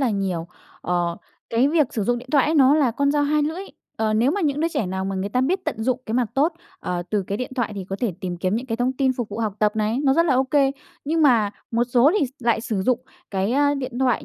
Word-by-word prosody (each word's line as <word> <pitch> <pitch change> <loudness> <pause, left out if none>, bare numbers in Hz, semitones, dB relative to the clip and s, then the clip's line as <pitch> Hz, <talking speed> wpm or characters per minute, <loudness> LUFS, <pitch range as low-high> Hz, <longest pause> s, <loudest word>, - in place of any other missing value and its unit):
là 260 -4 +2
nhiều. 185 -5 -2 0.3
Ờ, 175 -1 -1 0.3
cái 235 +4 +3
việc 305 -2 +3
sử 215 - 0
dụng 240 +3 +1
điện 255 +2 -12
thoại 280 - +5
ấy 315 - +1
nó 275 -1 +6
là 285 -6 +3
con 280 +4 +1
dao 295 0 +2
hai 295 +1 +2
lưỡi, 320 +6 -2 0.3
ờ, 215 -1 0
nếu 235 +5 +3
mà 405 +5 -1
những 295 -3 0
đứa 330 - +2
trẻ 225 - -2
nào 190 +1 -3
mà 195 0 -3
người 190 +2 -2
ta 250 +4 0
biết 365 +8 0
tận 220 - -3
dụng 255 +1 0
cái 220 - -3
mặt 245 -3 +1
tốt, 300 +6 +2 0.3
ờ, 175 -1 -3
từ 210 -2 +1
cái 200 - -3
điện 250 - -4
thoại 235 -4 -1
thì 195 -2 -5
có 195 - -3
thể 235 -7 0
tìm 180 -1 -4
kiếm 185 +3 -1
những 250 - -4
cái 225 -2 -2
thông 250 +2 0
tin 265 0 +1
phục 240 -3 -4
vụ 210 - -6
học 215 -3 -1
tập 210 +1 +1
này 215 +3 0
nó 270 - +4
rất 335 +2 +3
là 270 - +3
ô 260 - +3
kê, 270 0 +2 0.3
nhưng 320 +2 +1
mà 230 -8 +4 0.2
một 235 +1 +1
số 245 +3 +4
thì 285 - +2
s - - -13
lại 235 -2 +1
sử 215 -4 -2
dụng 250 +2 +1 0.3
cái, 195 +3 0
ơ, 285 +1 +3
điện 255 -3 -4
thoại 255 -3 +1
245 Hz, 290 wpm, -23 LUFS, 210-280 Hz, 0.3 s, nó